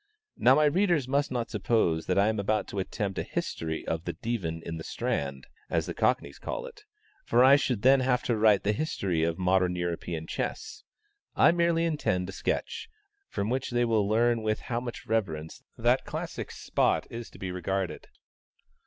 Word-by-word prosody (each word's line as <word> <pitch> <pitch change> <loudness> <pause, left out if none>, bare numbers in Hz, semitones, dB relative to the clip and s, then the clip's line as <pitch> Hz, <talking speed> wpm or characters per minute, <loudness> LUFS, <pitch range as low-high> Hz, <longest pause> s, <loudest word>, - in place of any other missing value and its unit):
Now 130 +2 +5
my 150 +1 +4
readers 170 -3 +2
must 140 +2 +1
not 120 -2 -3
suppose 85 -9 +1
that 90 - +1
I 100 +1 +4
am 110 -1 0
about 105 +1 0
to 100 - -4
attempt 95 0 -3
a - - +1
history 80 -1 -3
of 80 +2 -3
the - - -2
"Divan 85 -9 -3
in 80 - -4
the 80 - -7
Strand," 70 -3 -3 0.2
as - - 0
the - - -4
Cockneys 70 - 0
call - - -4
it; 425 -4 -12 0.4
for 125 - +4
I 135 +2 +8
should 125 -7 0
then 135 +1 +6
have 125 -1 +1
to 120 - +1
write 105 -2 +4
the 105 - +2
history 100 - -1
of 85 0 0
modern 90 -1 +2
European 85 -2 -3
chess. - - -4 0.5
I - - +6
merely 170 -1 +2
intend 90 - 0
a - - -4
sketch, - - -3 0.4
from 100 +3 -2
which 130 +1 -1
they 120 0 +1
will 110 -3 +2
learn 115 +1 +3
with 110 0 -1
how 120 -1 -2
much 120 -1 -7
reverence 80 -9 -2 0.2
that - - +2
classic - - -5
spot - - 0
is 115 0 -6
to - - -15
be 95 -1 -4
regarded. 95 +1 -3
110 Hz, 190 wpm, -28 LUFS, 90-125 Hz, 0.5 s, I